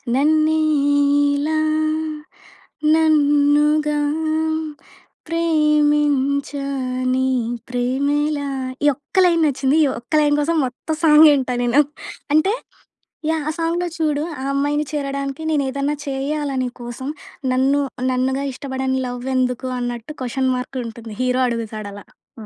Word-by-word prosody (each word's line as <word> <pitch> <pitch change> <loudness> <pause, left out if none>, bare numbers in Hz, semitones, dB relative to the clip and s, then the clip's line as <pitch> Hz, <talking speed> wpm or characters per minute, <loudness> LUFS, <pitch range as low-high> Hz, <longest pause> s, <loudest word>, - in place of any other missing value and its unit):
నన్నె 310 +3 +3 0.8
ఇలా 310 +2 0 1.4
నన్నుగా 300 -1 +3 1.3
ప్రేమించా 295 -3 +1 0.5
నీ 260 0 +1 0.4
ప్రేమేల 280 +4 0 0.5
ఈ - - +6
ఒక్క 290 +7 -11
లైన్ 340 -2 +3
నచ్చింది. 275 -1 +1
ఈ - - +4
ఒక్క 240 +6 -13
లైన్ 290 -1 +3
కోసం 320 +3 0
మొత్తం 260 +5 -4
సాంగె 305 0 +8
ఇంట 255 -2 -2
నేను. 245 +4 +4 0.5
అంటే 310 +7 +3 0.8
యాహ్! 320 -1 0
ఆ - - 0
సాంగ్‌‌లో 340 +2 0
చూడు, 305 -2 0 0.2
ఆ - - -5
అమ్మాయిని 290 +2 0
చేరడానికి 275 -1 -3
నేనేదైనా 280 0 0
చేయాల 285 +2 -2
నీ 250 - -2
కోసం, 240 +3 -6 0.4
నన్ను 270 +3 +2 0.3
నన్నుగా 265 +2 0
ఇష్టపడని 265 0 -2
లవ్ 245 +1 -6
ఎందుకు, 255 0 0
అన్నట్టు 245 +3 -5
క్వెషన్ 260 +1 0
మార్క్ 255 +1 -5
ఉంటుంది 225 -1 -9
హీరో 255 0 +1
అడుగుతాడు 220 -3 -4
అలా. 205 - -11 0.4
ఆ! - - -9
280 Hz, 115 wpm, -20 LUFS, 255-300 Hz, 1.4 s, సాంగె